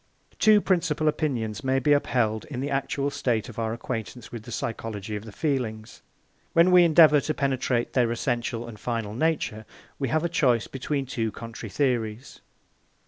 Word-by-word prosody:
Two 215 Hz, -1 st, +6 dB
principal 165 Hz, -5 st, +1 dB
opinions 125 Hz, -9 st, -1 dB
may 130 Hz, 0 st, +1 dB
be 145 Hz, +2 st, +3 dB
upheld 115 Hz, -6 st, +1 dB
in 130 Hz, -4 st, -6 dB
the 140 Hz, +2 st, -3 dB
actual 140 Hz, +1 st, -1 dB
state 115 Hz, -5 st, -1 dB
of 115 Hz, -, -8 dB
our 110 Hz, -1 st, -1 dB
acquaintance 115 Hz, 0 st, -5 dB
with 120 Hz, -, -6 dB
the 120 Hz, -, -9 dB
psychology 110 Hz, -2 st, -4 dB
of 105 Hz, +1 st, -6 dB
the 110 Hz, -, -9 dB
feelings. 115 Hz, -6 st, -3 dB, 0.5 s
When 170 Hz, +2 st, +5 dB
we 180 Hz, -1 st, +8 dB
endeavour 155 Hz, -3 st, +6 dB
to 155 Hz, -, -2 dB
penetrate 130 Hz, -3 st, 0 dB
their 120 Hz, -3 st, +2 dB
essential 120 Hz, -1 st, -2 dB
and 110 Hz, -3 st, -10 dB
final 115 Hz, -4 st, -3 dB
nature, 135 Hz, -5 st, -1 dB, 0.4 s
we 135 Hz, -, 0 dB
have 155 Hz, +5 st, 0 dB
a -, -, +2 dB
choice 125 Hz, -9 st, +2 dB
between 135 Hz, +1 st, -3 dB
two 115 Hz, -3 st, -2 dB
contrary 115 Hz, -1 st, -8 dB
theories. 120 Hz, -1 st, -2 dB
125 Hz, 170 wpm, -26 LUFS, 115-145 Hz, 0.5 s, we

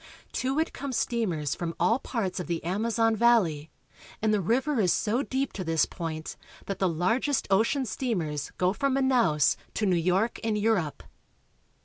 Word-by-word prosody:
To 265 Hz, +2 st, -1 dB
it 320 Hz, -, 0 dB
come 275 Hz, 0 st, -5 dB
steamers 200 Hz, -, -1 dB
from 170 Hz, -1 st, -4 dB
all 230 Hz, +3 st, +3 dB
parts 200 Hz, -9 st, -3 dB
of 180 Hz, -, -5 dB
the 170 Hz, -1 st, -2 dB
Amazon 225 Hz, +5 st, +1 dB
valley, 195 Hz, -10 st, +3 dB, 0.5 s
and 215 Hz, 0 st, +1 dB
the 205 Hz, -, +2 dB
river 255 Hz, -, +1 dB
is 185 Hz, -5 st, +3 dB
so 225 Hz, +4 st, +1 dB
deep 270 Hz, -1 st, -2 dB
to 190 Hz, -, -4 dB
this 165 Hz, -2 st, +2 dB
point 160 Hz, -2 st, -5 dB, 0.3 s
that 195 Hz, -1 st, -4 dB
the 190 Hz, -, +2 dB
largest 225 Hz, -, 0 dB
ocean 230 Hz, +7 st, +2 dB
steam 230 Hz, -2 st, -1 dB
ers 150 Hz, -2 st, -4 dB
go 180 Hz, +1 st, +2 dB
from 275 Hz, +3 st, 0 dB
Manaos 245 Hz, -, +3 dB, 0.2 s
to 215 Hz, -, 0 dB
New 185 Hz, -3 st, +3 dB
York 185 Hz, +7 st, +1 dB
and 220 Hz, -2 st, 0 dB
Europe. 205 Hz, -8 st, 0 dB
210 Hz, 170 wpm, -27 LUFS, 175-240 Hz, 0.5 s, all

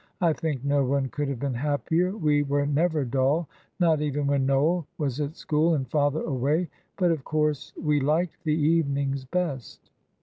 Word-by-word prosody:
"I 170 Hz, -5 st, +3 dB
think 150 Hz, -5 st, -3 dB
no 140 Hz, 0 st, +2 dB
one 135 Hz, 0 st, 0 dB
could 145 Hz, +2 st, -3 dB
have 140 Hz, -, -3 dB
been 140 Hz, 0 st, -2 dB
happier 160 Hz, -, 0 dB
we 150 Hz, -5 st, +2 dB
were 145 Hz, 0 st, 0 dB
never 150 Hz, 0 st, +1 dB
dull, 135 Hz, +6 st, +1 dB, 0.3 s
not 165 Hz, -4 st, +3 dB
even 145 Hz, -1 st, -1 dB
when 140 Hz, -1 st, +1 dB
Noel 150 Hz, +5 st, +2 dB
was 140 Hz, -2 st, -2 dB
at 145 Hz, +2 st, -3 dB
school 160 Hz, +2 st, +1 dB
and 135 Hz, -3 st, -2 dB
father 145 Hz, +3 st, +1 dB
away; 150 Hz, +5 st, 0 dB, 0.3 s
but, 180 Hz, -3 st, +3 dB
of 155 Hz, -5 st, -2 dB
course, 150 Hz, -2 st, -1 dB
we 150 Hz, -2 st, +1 dB
liked 155 Hz, +5 st, 0 dB
the 155 Hz, -2 st, +1 dB
evenings 140 Hz, -4 st, +1 dB
best!" 140 Hz, -4 st, -4 dB
145 Hz, 175 wpm, -26 LUFS, 140-160 Hz, 0.3 s, I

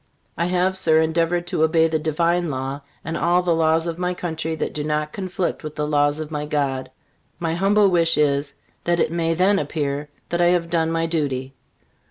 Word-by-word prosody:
I 170 Hz, -, 0 dB
have, 180 Hz, +1 st, +1 dB
Sir, 160 Hz, -4 st, +3 dB
endeavored 165 Hz, +2 st, +1 dB
to 175 Hz, -, -2 dB
obey 160 Hz, +1 st, +4 dB
the 160 Hz, -1 st, 0 dB
Divine 170 Hz, +2 st, +1 dB
law 135 Hz, +1 st, -4 dB, 0.2 s
and 165 Hz, -, -3 dB
all 175 Hz, +2 st, +2 dB
the 175 Hz, -1 st, +2 dB
laws 160 Hz, 0 st, +2 dB
of 170 Hz, 0 st, -4 dB
my 180 Hz, 0 st, -1 dB
country 160 Hz, -2 st, -3 dB
that 155 Hz, -, -3 dB
do 150 Hz, -, -3 dB
not 150 Hz, 0 st, -2 dB
conflict 185 Hz, -2 st, -3 dB
with 155 Hz, -1 st, -6 dB
the 150 Hz, -, -1 dB
laws 145 Hz, 0 st, +2 dB
of 155 Hz, 0 st, -6 dB
my 150 Hz, -1 st, -3 dB
God. 140 Hz, -3 st, -1 dB, 0.5 s
My 165 Hz, -1 st, -2 dB
humble 200 Hz, +4 st, +3 dB
wish 170 Hz, -3 st, +3 dB
is, 140 Hz, -1 st, +1 dB, 0.3 s
that 175 Hz, 0 st, +1 dB
it -, -, +1 dB
may 165 Hz, -1 st, 0 dB
then 195 Hz, +3 st, +3 dB
appear 145 Hz, -1 st, -3 dB, 0.2 s
that 175 Hz, 0 st, 0 dB
I 175 Hz, -, +5 dB
have 175 Hz, -2 st, +1 dB
done 165 Hz, -1 st, +1 dB
my 165 Hz, 0 st, 0 dB
duty. 140 Hz, -5 st, -2 dB
160 Hz, 205 wpm, -22 LUFS, 150-175 Hz, 0.5 s, I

